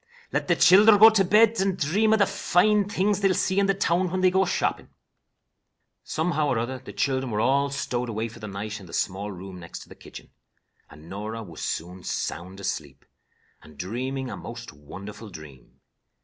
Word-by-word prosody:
Let - - -1
the - - +3
childer 205 +4 +7
go 220 +2 +9
to 210 -3 +3
bed 215 +3 +4
and 195 -1 0
dream 200 +9 +1
of 220 - +5
the 200 - +4
fine 205 +3 +2
things 205 0 +1
they 200 - +3
will 185 - +1
see 190 +1 +1
in 200 - +2
the 195 - +2
town 180 -1 +1
when 185 +1 -2
they 185 -1 +4
go 190 +1 +3
shopping." - - -2 1.1
Somehow 155 -1 -1
or 130 - 0
other 125 +3 -3
the 130 - -11
children 130 -2 -1
were 105 -2 -2
all 140 +5 +2
stowed 125 -3 -3
away 110 +1 -2
for 115 - -13
the 110 - -7
night 105 +1 -6
in 95 - -13
the - - -13
small 100 +2 -2
room 95 0 -9
next 85 -1 -9
the - - -12
kitchen, - - -13 0.6
and 75 +2 -15
Norah 105 +4 -6
was 85 -6 -11
soon 90 +2 -4
sound 95 +4 -4
asleep, 70 -7 -5 0.6
and 75 -2 -17
dreaming 130 - -4
a - - -5
most 120 -3 -9
wonderful 100 +9 -10
dream. 75 -8 -14
125 Hz, 195 wpm, -25 LUFS, -, 1.1 s, go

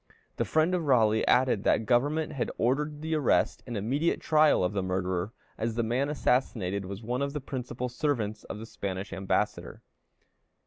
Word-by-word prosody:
The - - 0
friend 160 +3 +2
of 175 -3 0
Raleigh 110 -5 +3
added 125 -5 +3
that 110 - +2
government 145 +7 +1
had 135 - -2
ordered 150 +5 0
the 160 0 -2
arrest 150 -5 +2
and 120 -3 -4
immediate 135 +11 0
trial 155 -8 +4
of 90 - 0
the 100 - 0
murderer, 95 +1 -2 0.3
as 115 0 -1
the 115 - +1
man 125 +5 0
assassinated 105 -9 0
was 100 +3 -7
one 125 +4 -2
of 140 0 -1
the 150 - -2
principal 125 -2 -4
servants 120 -5 -2
of - - -6
the 110 - -7
Spanish 95 -3 -5
ambassador. 95 0 -2
120 Hz, 175 wpm, -28 LUFS, 105-145 Hz, 0.3 s, trial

